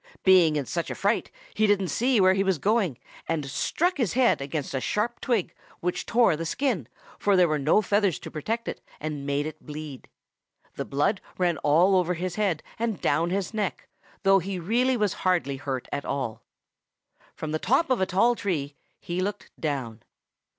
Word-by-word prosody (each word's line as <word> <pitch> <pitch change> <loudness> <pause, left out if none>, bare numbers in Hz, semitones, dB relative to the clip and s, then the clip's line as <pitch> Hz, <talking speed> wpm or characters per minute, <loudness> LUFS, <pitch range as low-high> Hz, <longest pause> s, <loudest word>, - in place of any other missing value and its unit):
Being 180 -5 +6
in 145 -2 -1
such 170 +6 -3
a - - -4
fright, 205 +3 0 0.2
he 215 0 +2
didn't 195 -3 +2
see 245 -1 +2
where 185 -1 +6
he 195 +1 +1
was 190 -3 +1
going, 195 - +1 0.3
and 160 -3 -1
struck 345 - 0
his 235 -9 0
head 250 - +3
against 140 +1 -4
a 130 - -1
sharp 220 - -1
twig, 230 -8 0 0.3
which 180 +1 -2
tore 235 -8 +4
the 165 - -4
skin, 205 - -1 0.3
for 200 -1 +3
there 180 -1 +6
were 155 -1 0
no 155 +10 +3
feathers 200 -3 +2
to - - -8
protect 225 +10 -3
it, - - -5 0.2
and 150 -2 -4
made 140 +1 0
it 155 - -7
bleed. 150 -3 -8 0.7
The - - -4
blood 145 +8 0 0.2
ran 175 -3 +1
all 170 +6 +4
over 180 -1 +2
his 180 +1 -3
head 190 -6 0 0.2
and 225 -5 -1
down 165 +4 +1
his 195 +3 -2
neck, 210 -3 -3 0.4
though 195 0 +6
he 190 +1 -4
really 240 +9 +1
was 210 -3 +1
hardly 175 -7 +1
hurt 135 -2 -4
at 140 - -2
all. 130 -6 -3 0.9
From 155 - -5
the 155 - -1
top 270 - +2
of 250 - +2
a 190 - +2
tall 230 +6 +3
tree 165 -11 -2 0.3
he 175 +1 -3
looked 205 +2 -4
down. 130 -8 -3
180 Hz, 190 wpm, -26 LUFS, 150-210 Hz, 0.9 s, Being